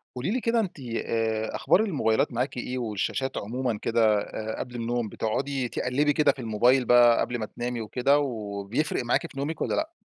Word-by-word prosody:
قولي 125 +9 -2
لي 250 +3 0
كده 230 0 +2
أنتِ 190 -8 -3
آآ 115 -3 -2
أخبار - - +3
الموبايلات 135 - +1
معاكِ 125 +2 -2
إيه 125 +1 -3
والشاشات 120 +3 -2
عمومًا 120 0 -2
كده، 110 -2 +3
آآ، 110 +1 -5
قبل 125 -1 -6
النوم 120 -1 -2
بتقعدي 130 +5 -2
تقلبي 145 +6 +1
كده 150 0 +4
في - - -13
الموبايل 120 +3 +3
بقى 120 -1 +6
قبل 120 - -1
ما 110 - -2
تنامي 120 +2 -4
وكده، 130 +6 +2
وبيفرق 110 +1 -2
معاكِ 120 - 0
في - - -14
نومِك 150 +4 -3
والّا - - 0
لأ؟ 315 +1 -1
120 Hz, 185 wpm, -26 LUFS, 110-135 Hz, -, بقى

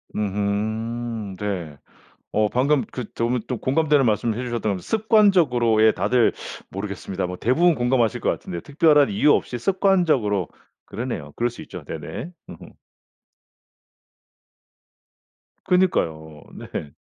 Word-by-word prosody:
음음 105 +2 -2
네. 90 -8 -4 0.5
어 105 0 +2
방금 135 +4 +2
그 125 - -5
너무 120 +1 0
또 125 - -3
공감되는 145 +2 +2
말씀해 115 +2 0
주셨던 115 -5 -2
게 90 - -10
습관적으로의 175 - +3
예 - - +6
다들 110 +5 +2 0.4
모르겠습니다. 95 -1 -4
뭐 90 - -5
대부분 165 +8 +3
공감하실 120 -3 +1
것 - - +1
같은데 85 - -4
특별한 145 -3 +3
이유 145 +9 +4
없이 120 - -1
습관적으로 155 - +2 0.4
그러네요. 115 +4 -5
그럴 120 +1 0
수 - - -11
있죠. - - -9
네네. 80 - -7 0.2
음음. - - -12 2.9
그니까요. 80 - 0
네. 75 - -7
115 Hz, 275 characters per minute, -23 LUFS, 100-145 Hz, 2.9 s, 예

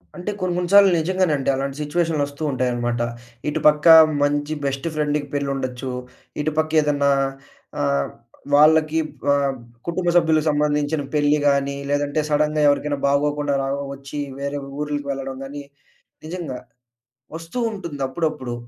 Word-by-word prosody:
అంటే 180 +4 -4
కొన్ని 185 -1 -1
కొన్ని 180 -1 -2
సార్లు 200 -1 +8
నిజంగానండి. 160 -5 0
అలాంటి 135 0 -3
సిట్యుయేషన్‌‌లొస్తూ 150 -2 -1
ఉంటాయనమాట. 120 -2 -1 0.5
ఇటు 150 - -1
పక్క 150 +2 +3 0.4
మంచి 145 +1 0
బెస్ట్ 135 +3 -2
ఫ్రెండ్‌కి 150 -1 -1
పెళ్లుండొచ్చు. 135 -2 -3 0.5
ఇటు 155 +1 -1
పక్క 155 0 0
ఏదన్నా 145 -1 +1 0.7
ఆహ్, 70 -1 +1 0.5
వాళ్ళకి 155 +1 +5 0.3
ఆహ్, 140 -1 +1 0.3
కుటుంబ 175 +1 0
సభ్యులకి 160 -2 +3
సంబంధించిన 150 0 0
పెళ్లి 150 0 +3
గాని 140 0 +1
లేదంటే 145 +1 0
సడెన్‌గా 150 0 +1
ఎవరికైనా 145 0 0
బాగోకుండా 145 +1 +1
రా 135 - -2 0.3
ఒచ్చి 140 +1 -8 0.2
వేరే 140 +1 -3 0.2
ఊర్లికి 145 -1 -3
వెళ్లడం 135 -1 -5
గాని 145 +1 -7 0.6
నిజంగా. 160 -6 -5 0.8
ఒస్తూ 165 +8 -7
ఉంటుంది 170 -9 -6
అప్పుడప్పుడు. 130 -4 -3
145 Hz, 125 wpm, -22 LUFS, 140-155 Hz, 0.8 s, సార్లు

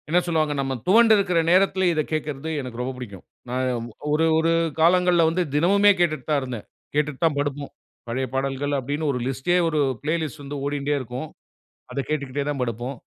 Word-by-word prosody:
என்ன 175 +3 +4
சொல்வாங்க, 155 -3 +1
நம்ம 135 -1 -1
துவண்டுருக்கிற 200 -4 +5
நேரத்திலே 190 +1 +3
இதைக் 155 -1 -2
கேட்கிறது 155 -1 -3
எனக்கு 125 -2 -7
ரொம்ப 125 +1 -2
புடிக்கும். 100 -7 -9 0.3
நான் 125 -1 -1 0.3
ஒரு 155 +2 +3
ஒரு 165 +1 +2 0.3
காலங்கள்ல 175 +1 +4
வந்து 175 +3 0
தினமுமே 200 +6 +5
கேட்டுட்டு 155 -6 +1
தான் 150 -2 +3
இருந்தேன். 125 -5 -6 0.3
கேட்டுட்டு 150 -2 0
தான் 160 -3 +2
படுப்போம். 145 0 -3 0.4
பழைய 130 +3 -2
பாடல்கள் 135 +2 -1
அப்டின்னு 145 +4 -2
ஒரு 125 - -2
லிஸ்ட்டே, 135 +7 0
ஒரு 155 -2 0 0.2
பிளே 155 +2 0
லிஸ்ட் 155 -1 -6
வந்து 140 +1 -6
ஓடின்டே 145 0 -1
இருக்கும். 130 +4 -6 0.7
அதக் 135 +1 -3
கேட்டுகிட்டே 145 -2 -2
தான் 145 -2 -2
படுப்போம். 120 +3 -3
145 Hz, 170 wpm, -24 LUFS, 130-165 Hz, 0.7 s, துவண்டுருக்கிற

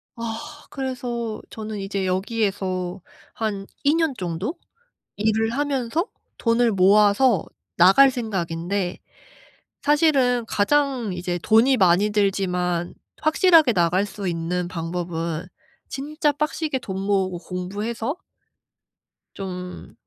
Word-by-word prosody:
아. 230 +6 -6
그래서 240 -4 -4
저는 215 -1 -6
이제 195 -1 -2
여기에서 190 -2 -1 0.3
한 205 -3 -3 0.2
2 285 +2 +4
년 325 -4 +1
정도 185 - -3 0.6
일을 220 +2 +1
하면서 280 - -1 0.3
돈을 230 0 +2
모아서 205 +3 +4 0.3
나갈 195 +11 +7
생각인데 185 -5 -2 0.8
사실은 275 -6 +3
가장 260 -1 +1
이제 175 0 -3
돈이 235 +4 +4
많이 190 +2 +4
들지만 180 -4 0 0.3
확실하게 315 - +5
나갈 180 +2 +2
수 200 -1 -6
있는 175 +1 -2
방법은 170 -1 -4 0.4
진짜 295 +2 -1
빡세게 300 -1 -2
돈 190 -4 -5
모으고 190 -3 0
공부해서 205 - -4 1.2
좀 180 -2 -7
205 Hz, 215 characters per minute, -23 LUFS, 180-250 Hz, 1.2 s, 나갈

